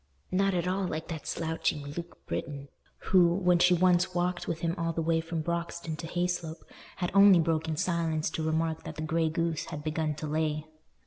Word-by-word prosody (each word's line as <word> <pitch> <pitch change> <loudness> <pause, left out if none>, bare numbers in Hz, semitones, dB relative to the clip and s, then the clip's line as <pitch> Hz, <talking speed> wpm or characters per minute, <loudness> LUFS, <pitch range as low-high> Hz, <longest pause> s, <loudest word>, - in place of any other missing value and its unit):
Not 195 +1 +2
at 175 0 0
all 190 +1 0
like 160 0 -4
that 160 -3 -6
slouching 160 -2 -1
Luke 170 +4 -8
Britton, 140 -2 -5 0.4
who, 175 -2 +6
when 180 -2 +3
she 180 +1 +5
once 180 0 +3
walked 175 0 -1
with 165 -1 -3
him 170 0 0
all 165 -1 -1
the 165 - -1
way 165 0 +2
from 165 -1 -4
Broxton 170 -1 -3
to 165 - -6
Hayslope, 175 -2 -2 0.3
had 175 -2 -2
only 195 -2 +8
broken 160 -1 0
silence 165 -2 0
to 160 - -3
remark 160 0 0
that - - -7
the 155 - -4
grey 160 +1 +1
goose 165 -1 -1
had 150 - -7
begun 155 0 -1
to 155 - -6
lay. 155 0 -1
165 Hz, 195 wpm, -29 LUFS, 160-175 Hz, 0.4 s, only